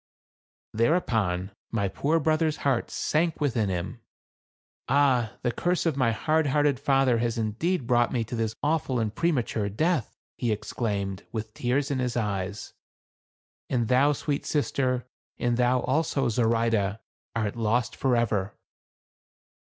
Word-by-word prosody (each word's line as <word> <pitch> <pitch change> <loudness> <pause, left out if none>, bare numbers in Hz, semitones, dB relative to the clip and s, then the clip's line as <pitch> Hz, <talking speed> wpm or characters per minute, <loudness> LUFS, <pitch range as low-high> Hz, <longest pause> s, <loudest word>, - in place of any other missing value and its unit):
Thereupon 110 - +1 0.2
my 100 -3 0
poor 150 +11 +1
brother's 155 0 +1
heart 135 -4 +1
sank 160 +1 0
within 115 -8 +1
him. 90 -2 -4 0.9
"Ah! 130 -6 +3
the 120 - +1
curse 175 +7 0
of 165 -4 +1
my 130 -4 +2
hard 155 +8 +1
hearted 145 -1 +2
father 135 -4 +3
has 120 0 -1
indeed 120 - -1
brought 120 -1 +3
me 120 -3 0
to 115 +2 -6
this 110 -1 -1
awful 145 -4 +1
and 110 -2 -1
premature 120 -9 0
death," 155 - 0 0.2
he 120 -3 0
exclaimed, 100 -3 -3
with 110 -1 -5
tears 135 +5 0
in 135 - 0
his 125 -1 -1
eyes; 100 -3 -3 1.0
"and 120 -3 0
thou, 135 +3 +4
sweet 145 0 -2
sister, 130 -4 0 0.3
and 120 -1 0
thou, 125 +1 +3
also, 135 0 +1
Zoraide, 115 -3 +1 0.4
art 110 -3 -1
lost 120 +2 0
for 130 -2 +1
ever." 105 -4 0
120 Hz, 140 wpm, -27 LUFS, 110-140 Hz, 1.0 s, thou